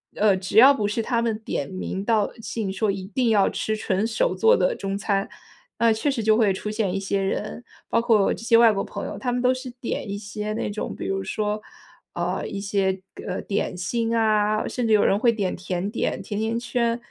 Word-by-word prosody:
呃， 210 -2 +4
只 185 +2 -3
要 265 +5 +9
不 215 -7 -1
是 210 +3 -1
他 235 +1 0
们 230 -2 0
点 145 -10 -3
名 190 +1 -4
道 215 -1 +2
姓 215 -3 -3
说， 205 +2 0
一 195 -1 -5
定 235 +4 0
要 205 -3 +4
吃 220 - -2
纯 205 -1 -1
手 230 - 0
做 455 +2 +5
的 - - +1
中 195 0 -3
餐， 200 -1 0 0.5
呃， 230 -1 +4
确 220 +7 0
实 255 -4 -2
就 220 0 +4
会 215 -4 +3
出 200 +3 -5
现 210 -3 -1
一 195 - -1
些 195 0 -1
人， 210 +4 -3 0.3
包 - - +2
括 225 -4 +3
这 - - -8
些 230 0 +5
外 230 -1 +7
国 195 -2 -1
朋 - - -6
友， - - -6
他 250 -2 -2
们 245 - -1
都 250 +1 +4
是 255 0 -6
点 230 - -3
一 200 - -3
些 210 +1 -5
那 215 - -2
种， 205 +1 -4
比 - - -6
如 195 0 -1
说， 210 +1 -2 0.5
呃， 175 +2 -2
一 200 - -5
些， 195 -1 0 0.3
呃， - - -3
点 200 -2 -2
心 230 +6 -1
啊， 215 -1 +2
甚 245 -2 -2
至 220 - +3
有 210 - +5
人 200 - +3
会 235 +1 +4
点 200 -4 -1
甜 180 +1 -3
点， 230 - -2
甜 205 -1 -4
甜 225 +1 -1
圈， 235 -1 0
215 Hz, 245 characters per minute, -24 LUFS, 195-230 Hz, 0.5 s, 要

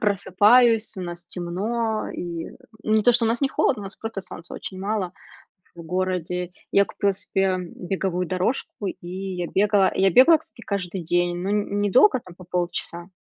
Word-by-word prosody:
просыпаюсь, 210 +3 +4
у - - -5
нас 175 0 -6
темно, 215 +7 -2
и, 170 -2 -5 0.3
не 215 0 +3
то 245 +3 +5
что 235 0 +2
у - - +2
нас 235 +1 0
не 275 - +2
холодно, 255 -4 +1
у - - -7
нас 195 - -9
просто 225 -3 -5
солнца 180 -2 -10
очень 190 - -7
мало 195 -2 -2 0.6
в 170 - -9
городе. 180 0 -2 0.2
Я 200 0 +5
купила 200 -1 0
себе 195 -1 0 0.2
беговую 180 0 -2
дорожку, 190 +2 -2
и 175 - -7
я 185 -1 -4
бегала, 200 -1 +3
я 195 0 +3
бегала, 285 - +7
кстати, 315 -6 -14
каждый 185 -2 -3
день, 175 +1 +1
но 185 +3 -3
н 205 -1 -1
недолго, 245 - +4
там, 180 -5 -14
по 185 - -14
полчаса. 175 0 -3
190 Hz, 175 wpm, -24 LUFS, 180-215 Hz, 0.6 s, бегала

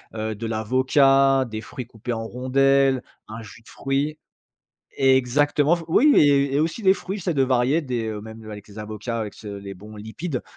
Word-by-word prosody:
heu, 110 0 -3
de 115 +2 -6
l'avocat, 130 +4 +3
des 110 -1 -6
fruits 125 - -8
coupés 115 +1 -6
en 115 0 -4
rondelles, 135 +2 +2 0.2
un 110 +1 -8
jus 110 +1 -13
de - - -19
fruit. 140 +3 -2 0.8
Exactement 140 +4 +3
f 170 - -6
oui 285 - +5
et 140 -2 +4
et 145 - +2
aussi 165 +8 -2
des 190 - +6
fruits, 195 +1 -6
j'essaient 175 -3 -2
de 135 - +2
varier 130 +5 +2
des, 125 -4 -3
heu, 105 -1 -4
même, 110 +1 -10
heu, 110 - -8
avec 105 0 -11
les 105 - -12
avocats, 110 +2 -5
avec 105 -2 -5
ce 105 - -11
les 100 -1 -7
bons 105 +3 -12
lipides 125 +7 -5
130 Hz, 200 wpm, -23 LUFS, 110-140 Hz, 0.8 s, des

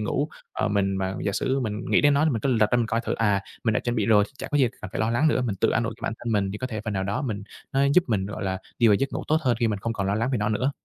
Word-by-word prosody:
ngủ, 140 +7 -1 0.2
ờ, - - -1
mình 100 -2 +1
mà 95 0 -2
giả 100 - 0
sử 135 +6 0
mình 105 -3 -3
nghĩ - - +5
đến 145 -1 +4
nó 145 +2 +3
thì 160 - +3
mình 115 -5 -1
cứ 135 - -1
lật 110 -3 +3
ra - - +3
mình 120 -2 +1
coi 115 +1 0
thử, - - -2
à, 105 -3 +2 0.2
mình 110 - +3
đã - - +1
chuẩn 120 0 -2
bị 105 - +1
rồi 105 -2 +5
chả - - -5
có 145 - +1
gì 130 - +4
cần 105 - -7
phải - - -2
lo 110 +1 +1
lắng 130 +7 +3
nữa, 140 - +1
mình 110 -6 -2
tự - - +3
an - - +1
ủi - - -3
bản - - -1
thân 115 -1 -3
mình 100 -2 +1
thì 105 - -5
có 130 - -3
thể 110 -4 -5
phần 110 - -2
nào 95 -1 -1
đó 100 +8 -2
mình 105 -6 -3 0.3
nó 135 - +2
giúp 180 - +5
mình, 100 -5 0
gọi 100 -1 -5
là, 95 0 -1 0.2
đi 120 - +5
vào 105 - +6
giấc 135 +7 -1
ngủ - - -3
tốt 155 - +4
hơn 125 -6 +1
khi 115 - +3
mình 105 -2 -1
không 115 +3 -2
còn 100 -4 -2
lo 100 - +1
lắng 115 +4 0
về 125 - +1
nó 105 0 0
nữa. 125 +6 +1
110 Hz, 365 wpm, -25 LUFS, 100-125 Hz, 0.3 s, vào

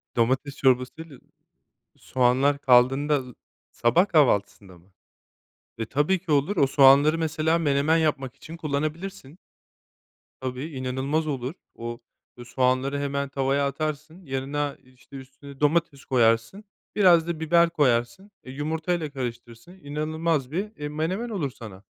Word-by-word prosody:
Domates 130 +4 0
çorbası 130 +3 +1
ile 155 -6 -12 0.8
soğanlar 130 +3 +1
kaldığında 135 +3 +3 0.5
sabah 170 +12 +2
kahvaltısında 100 - +1
mı? 90 +3 -25 0.9
E, 115 - -3
tabii 145 - +1
ki 175 -3 -4
olur. 150 +8 +1
O 140 - +4
soğanları, 140 +3 +5
mesela, 160 0 0
menemen 150 0 +2
yapmak 140 -5 -1
için 160 +4 -10
kullanabilirsin. 155 +1 -4 1.0
Tabii, 130 +1 -4
inanılmaz 130 +5 -2
olur. 135 -1 -3 0.2
O, 120 0 -6 0.4
ııı, 120 - -10
soğanları 130 +3 0
hemen 140 0 -2
tavaya 140 +1 0
atarsın. 155 +4 -5
Yanına, 140 +2 -3
işte, 130 +2 -18
üstüne 135 +1 -13
domates 150 -2 0
koyarsın 115 - +1 0.3
biraz 175 -5 +5
da 170 -2 -3
biber 170 +1 +3
koyarsın, 140 - 0
eee, 130 - -10
yumurtayla 160 +3 -2
karıştırırsın 120 +1 -7
inanılmaz 155 -1 -2
bir, 205 +6 -4
eee, 150 0 -5
menemen 170 +10 -3
olur 170 - -3
sana. 105 -6 -12
140 Hz, 125 wpm, -25 LUFS, 130-160 Hz, 1.0 s, soğanları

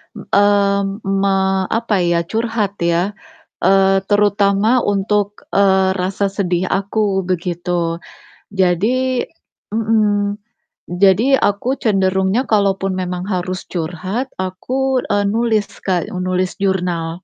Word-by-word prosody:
eee, 200 -1 +2 0.2
me 195 0 +1 0.4
apa 230 -2 -1
ya, 170 -1 +1
curhat 220 +1 -2
ya, 170 +3 +1 0.5
eee, 195 0 +4
terutama 205 +3 +3
untuk, 205 +1 -1
eee, 190 -1 +4
rasa 190 +2 -1
sedih 180 -2 0
aku, 200 0 0
begitu. 175 -1 -2 0.6
Jadi 235 +8 +1 0.5
mhm, 210 -2 +1 0.5
jadi 200 +9 +4
aku 205 +7 0
cenderungnya 190 0 +1
kalau 200 -3 +3
pun 195 0 -1
memang 180 -1 -3
harus 185 +1 -3
curhat, 185 +8 -3 0.2
aku, 255 +8 -1
eee, 205 -1 +1
nulis, 225 -2 +1 0.2
Kak, 185 +1 -1
e - - -8
nulis 185 +1 -1
jurnal. 180 -4 0
195 Hz, 110 wpm, -18 LUFS, 185-210 Hz, 0.6 s, eee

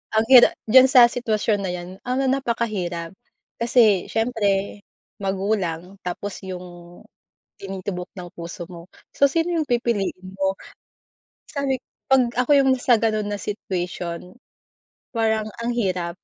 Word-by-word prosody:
Ang 220 - +3
hira 250 -2 +10 0.2
diyan 260 +2 +8
sa 245 -3 +7
sitwasyon 220 -3 0
na 195 -2 -3
'yan 175 0 -7 0.2
ano 255 +2 0
napakahirap, 215 -10 -2 0.5
kasi 230 -5 +3
siyempre 210 -4 0 0.4
magulang 190 -2 -2
tapos 200 +3 -5
yung, 180 -1 -6 0.9
tinitubok 190 -2 -6
ng 175 - -7
puso 170 0 -7
mo, 175 0 -12 0.2
so 280 -1 +4
sino 335 +2 0
yung 320 - +1
pipiliin 205 -7 -2
mo? 195 0 -1 0.9
Sabi 275 -3 -2 0.3
'pag 265 -2 +5
ako 250 +3 0
yung 270 -1 +4
na 255 - -6
sa 240 -3 +4
gano'n 215 -2 0
na 205 - -3
situation, 180 -3 -5 0.8
parang 220 -2 0
ang 235 +1 -2
hirap. 185 -7 -1
210 Hz, 130 wpm, -23 LUFS, 185-240 Hz, 0.9 s, hira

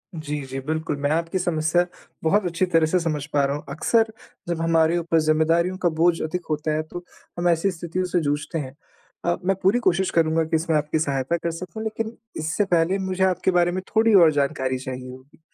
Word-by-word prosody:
जी, 150 -2 -4
जी। 135 +1 -5
बिल्कुल 160 -1 -2
मैं 145 - +1
आपकी 165 +3 0
समस्या 175 0 +1 0.4
बहुत 190 +5 +2
अच्छी 175 +2 0
तरह 165 -3 +3
से 180 +3 +2
समझ 155 -4 -2
पा 145 -1 +3
रहा 140 - -1
हूँ। 145 - -6
अक्सर, 220 +10 +1 0.4
जब 170 -1 -2
हमारे 165 0 +3
ऊपर 165 -1 +1
ज़िम्मेदारियों 165 +4 +2
का 180 -2 +1
बोझ 170 0 +3
अधिक 175 +3 -3
होता 155 0 -1
है, 155 - -1
तो 175 +3 -8 0.4
हम 175 - +1
ऐसी 170 +3 +2
स्थितियों 175 +1 -3
से 180 0 0
जूझते 150 +3 -2
हैं। 130 -1 -7 0.5
अ, 175 0 +2
मैं 195 - +2
पूरी 200 +6 +4
कोशिश 190 -4 +1
करूँगा 165 0 +2
कि 160 +1 -1
इसमें 160 0 0
आपकी 150 +1 -1
सहायता 140 +2 0
कर 170 0 -3
सकूँ, 180 +5 -7
लेकिन 220 +1 -4 0.2
इससे 160 +6 0
पहले 170 +3 +2
मुझे 190 0 -1
आपके 185 0 +2
बारे 175 0 +3
में 185 +1 -3
थोड़ी 225 0 +4
और 170 -5 +7
जानकारी 135 -2 0
चाहिए 130 0 -6
होगी। 130 +4 -15
165 Hz, 210 wpm, -23 LUFS, 155-180 Hz, 0.5 s, और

